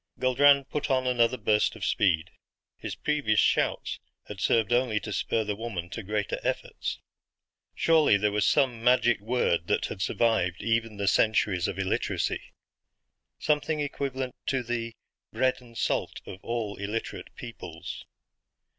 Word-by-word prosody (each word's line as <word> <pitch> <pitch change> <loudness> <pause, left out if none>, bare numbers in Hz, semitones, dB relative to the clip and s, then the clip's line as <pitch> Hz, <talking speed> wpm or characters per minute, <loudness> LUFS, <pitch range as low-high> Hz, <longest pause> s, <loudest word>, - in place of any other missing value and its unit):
Guldran 140 +2 +5
put 150 +2 -3
on 130 -1 +2
another 125 0 +2
burst 105 -1 +2
of - - -4
speed. 90 -3 +1 0.4
His - - -6
previous 145 -9 +1
shouts - - +1 0.3
had 105 - -8
served 115 +3 +2
only 120 -3 +2
to 105 0 -6
spur 110 - 0
the 105 -1 -2
woman 100 -6 -5
to 115 - -5
greater 105 0 -2
efforts. - - -3 0.8
Surely 160 -10 +4
there 105 +1 +1
was 105 0 +1
some 125 -5 +2
magic 120 -2 +4
word 105 -7 0
that - - +1
had 95 - -6
survived 100 -4 +1
even 115 -2 0
the 100 -1 -2
centuries 95 -1 +2
of - - -4
illiteracy. 95 -1 -1 1.0
Something 150 +1 0
equivalent 135 -3 -3
to 130 -2 0
the 115 -1 -3 0.4
"bread 130 0 +1
and 120 -2 -14
salt" - - -1
of 95 - -9
all 115 -4 -3
illiterate 105 +3 -5
peoples. 90 -8 -8
115 Hz, 145 wpm, -28 LUFS, 105-130 Hz, 1.0 s, Guldran